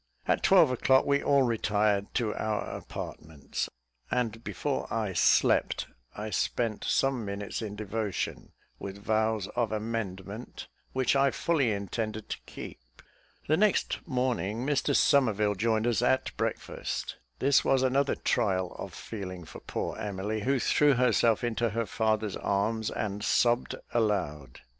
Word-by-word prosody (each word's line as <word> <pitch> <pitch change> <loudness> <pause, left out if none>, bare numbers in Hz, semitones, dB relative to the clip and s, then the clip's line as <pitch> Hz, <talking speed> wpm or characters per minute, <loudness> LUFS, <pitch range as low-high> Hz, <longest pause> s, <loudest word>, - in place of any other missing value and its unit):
At - - +2
twelve 180 -8 +6
o'clock, 130 +1 +3
we 140 0 +2
all 140 -1 +4
retired 105 -3 +1
to 110 -4 +1
our 110 -1 -1
apartments, 75 -2 -6 0.4
and 115 -2 -1
before 145 -2 -3
I 110 -4 -1
slept 85 - +3 0.3
I 105 +1 -5
spent 110 +3 -1
some 135 -3 +1
minutes 100 +1 -4
in 105 -2 -5
devotion, 105 -2 -3 0.3
with 100 0 -6
vows 110 -1 0
of 120 -3 -1
amendment 105 -1 -4 0.3
which 130 0 +2
I 135 0 +4
fully 140 -6 +1
intended 110 +2 -3
to - - -4
keep. - - -8 0.7
The 155 - +3
next 210 0 +2
morning, 125 - -1
Mr 145 -1 +1
Somerville 105 -7 +3
joined 110 +2 +1
us 120 -1 +2
at 130 +2 +1
breakfast. - - -3 0.2
This 135 0 +4
was 130 -1 +3
another 135 +2 +2
trial 95 -6 0
of - - -7
feeling 95 -4 -6
for - - -10
poor - - -4
Emily, 105 +2 -3
who 135 +5 +2
threw 145 +2 +4
herself 120 -2 +3
into 120 0 0
her 115 +2 -1
father's 110 -2 0
arms, 110 +3 0
and 105 -1 -3
sobbed 120 +3 +2 0.2
aloud. 75 - -1
110 Hz, 140 wpm, -29 LUFS, 105-125 Hz, 0.7 s, twelve